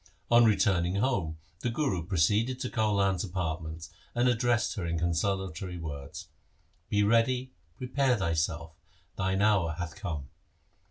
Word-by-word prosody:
On 120 Hz, 0 st, +7 dB
returning 95 Hz, -4 st, +2 dB
home 100 Hz, -9 st, 0 dB, 0.2 s
the 120 Hz, -, -1 dB
Guru 115 Hz, -, -1 dB
proceeded 105 Hz, +8 st, +1 dB
to 125 Hz, -, -3 dB
Kaulan's 100 Hz, -5 st, +1 dB
apartments 80 Hz, -4 st, -4 dB, 0.2 s
and 120 Hz, +1 st, +3 dB
addressed 120 Hz, -1 st, +2 dB
her 95 Hz, -6 st, -3 dB
consolatory 90 Hz, +1 st, -1 dB
words. 80 Hz, +1 st, -7 dB, 0.6 s
'Be 105 Hz, 0 st, +3 dB
ready, 125 Hz, +4 st, +2 dB, 0.2 s
prepare 130 Hz, 0 st, +1 dB
thyself, 80 Hz, -2 st, -1 dB, 0.4 s
thine 95 Hz, +1 st, 0 dB
hour 95 Hz, -7 st, +3 dB
hath 85 Hz, -1 st, -5 dB
come. 80 Hz, -9 st, -5 dB
95 Hz, 120 wpm, -29 LUFS, 85-115 Hz, 0.6 s, On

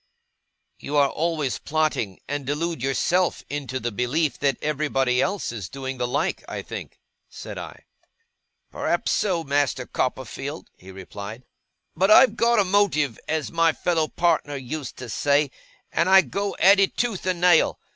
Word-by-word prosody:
'You 145 Hz, +1 st, -3 dB
are 140 Hz, -1 st, +4 dB
always 155 Hz, -5 st, -1 dB
plotting, 150 Hz, -11 st, -1 dB
and 145 Hz, 0 st, -3 dB
delude 150 Hz, +2 st, -2 dB
yourself 170 Hz, +7 st, +1 dB
into 135 Hz, -3 st, -3 dB
the 120 Hz, 0 st, -3 dB
belief 130 Hz, +6 st, -1 dB
that 140 Hz, -1 st, +1 dB
everybody 135 Hz, -4 st, 0 dB
else 195 Hz, -3 st, -1 dB
is 105 Hz, -6 st, -6 dB
doing 135 Hz, -1 st, -6 dB
the 125 Hz, -, 0 dB
like, 145 Hz, +8 st, -1 dB
I -, -, -5 dB
think,' -, -, -8 dB, 0.3 s
said -, -, -8 dB
I. -, -, -9 dB, 0.9 s
'Perhaps -, -, -1 dB
so, 185 Hz, -6 st, 0 dB
Master 140 Hz, -3 st, 0 dB
Copperfield,' 130 Hz, +5 st, -4 dB
he 95 Hz, -, -15 dB
replied. 100 Hz, -, -9 dB, 0.5 s
'But 190 Hz, +2 st, +2 dB
I've 250 Hz, +4 st, +7 dB
got 235 Hz, 0 st, +3 dB
a 205 Hz, -, +5 dB
motive, 180 Hz, -, +1 dB
as 160 Hz, -2 st, -2 dB
my 165 Hz, -1 st, +3 dB
fellow 165 Hz, -2 st, 0 dB
partner 160 Hz, -4 st, 0 dB
used 135 Hz, +1 st, -6 dB
to 125 Hz, -, -7 dB
say; 140 Hz, +5 st, +1 dB, 0.4 s
and 170 Hz, +2 st, +1 dB
I 190 Hz, 0 st, +8 dB
go 200 Hz, +1 st, -3 dB
at 195 Hz, +4 st, +6 dB
it 195 Hz, -, +2 dB
tooth 225 Hz, -7 st, -1 dB
and 180 Hz, -2 st, 0 dB
nail. 175 Hz, -3 st, +4 dB
145 Hz, 155 wpm, -24 LUFS, 130-175 Hz, 0.9 s, I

